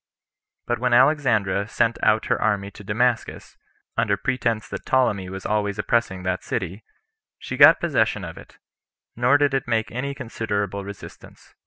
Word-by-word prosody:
But 120 -1 -2
when 125 0 +2
Alexandra 110 -9 +2
sent 115 +1 0
out 110 +1 +2
her - - 0
army 100 -2 0
to 105 - -13
Damascus, 115 +4 -1 0.4
under 105 -3 +1
pretense 115 -1 -1
that - - -7
Ptolemy 105 -8 +1
was 95 0 -8
always 105 -1 -1
oppressing 100 -3 0
that 90 0 -2
city, 95 +1 -4 0.5
she - - -6
got - - +8
possession - - 0
of - - -8
it; - - -15 0.6
nor 125 +4 +4
did 145 -1 +1
it 135 -3 -1
make 115 -2 -1
any 140 +4 -4
considerable 105 -6 -3
resistance. 100 -1 -12
110 Hz, 155 wpm, -23 LUFS, 100-125 Hz, 0.6 s, got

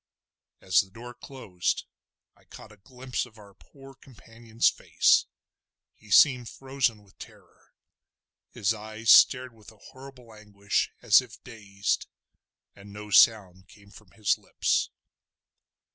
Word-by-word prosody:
As 95 -1 +2
the 95 - -1
door 120 +5 -12
closed 105 -11 -5 0.5
I - - -28
caught 110 - -15
a 105 - -18
glimpse 125 +4 -6
of 110 -2 -22
our 100 -2 -17
poor 135 +5 -17
companion's 115 -3 -4
face. - - +2 0.7
He 110 - -22
seemed 125 +2 +4
frozen 130 -5 -3
with 100 - -27
terror. - - -17 0.7
His 100 +2 -1
eyes 110 +1 -2
stared 125 -1 +5
with 110 -1 -17
a 110 - -23
horrible 130 0 -15
anguish 105 -2 -3
as 115 +1 +5
if 125 -3 -15
dazed, 100 -4 -4 0.7
and 100 0 -15
no 105 +1 -11
sound 95 -5 +3
came 100 -1 -20
from 110 -2 -18
his 105 -3 -1
lips. - - -2
110 Hz, 130 wpm, -26 LUFS, 100-125 Hz, 0.7 s, stared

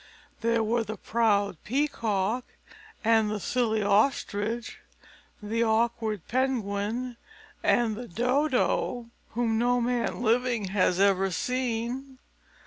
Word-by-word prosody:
There 230 0 +1
were 230 +1 +1
the 215 -1 -6
proud 205 -5 +1
Peacock 230 -4 0 0.6
and 225 -1 +4
the 210 0 -2
silly 220 +1 0
Ostrich, 215 +1 0 0.6
the 225 +3 0
awkward 220 -3 0
Penguin 240 -1 -1 0.4
and 230 -3 +2
the 240 +2 -7
Dodo, 245 - 0 0.2
whom 225 -1 +1
no 245 +1 +2
man 240 0 -1
living 235 -3 +1
has 185 -2 +2
ever 195 -1 +3
seen. 250 +5 -2
230 Hz, 105 wpm, -27 LUFS, 210-245 Hz, 0.6 s, and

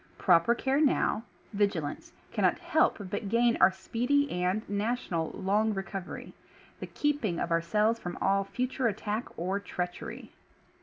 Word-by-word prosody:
Proper 180 +6 +4
care 270 +4 +1
now, 275 -6 +2 0.3
vig 205 0 +2
ilance, 145 -3 -5 0.2
cannot - - +2
help 315 - +2
but 205 0 -3
gain 235 +2 +3
our - - +7
speedy 250 +9 0
and 180 +4 -1
national 205 -6 -1
long 205 +3 +1
recovery 195 -1 -6 0.2
— - - -26
the - - -5
keeping 285 - -1
of - - -2
ourselves 210 +7 +2
from 175 -4 -5
all 195 0 +2
future 250 +5 -1
attack 215 +1 -2
or 185 +4 -1
treachery. 180 -3 -5
205 Hz, 145 wpm, -29 LUFS, 185-235 Hz, 0.3 s, our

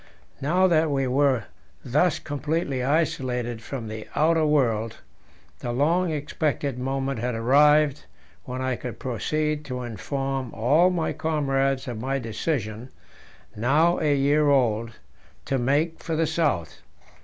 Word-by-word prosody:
Now 175 +7 +3
that 160 -3 +3
we 135 -2 0
were 130 -2 +2 0.4
thus 150 +6 +2
completely 145 -2 -2
isolated 125 -5 -1
from 120 -1 -6
the 110 0 -7
outer 160 0 +3
world, 115 -7 +1 0.6
the 120 - -4
long 165 +8 +2
expected 145 -3 -2
moment 135 0 -2
had 120 +1 -2
arrived 145 +4 +4 0.4
when 130 0 -4
I 130 -2 -1
could 125 - -6
proceed 150 +5 -2
to 125 -2 -4
inform 135 +3 -4
all 145 +11 +4
my 170 -4 -1
comrades 135 -4 0
of 115 -3 -5
my 135 +2 -1
decision, 115 -1 -3 0.7
now 150 +10 +3
a 150 -2 +2
year 145 +2 +3
old, 115 -4 +2 0.5
to 135 - 0
make 145 +6 +1
for 165 - -3
the 165 +1 +2
South. 145 - -1
135 Hz, 130 wpm, -25 LUFS, 125-155 Hz, 0.7 s, arrived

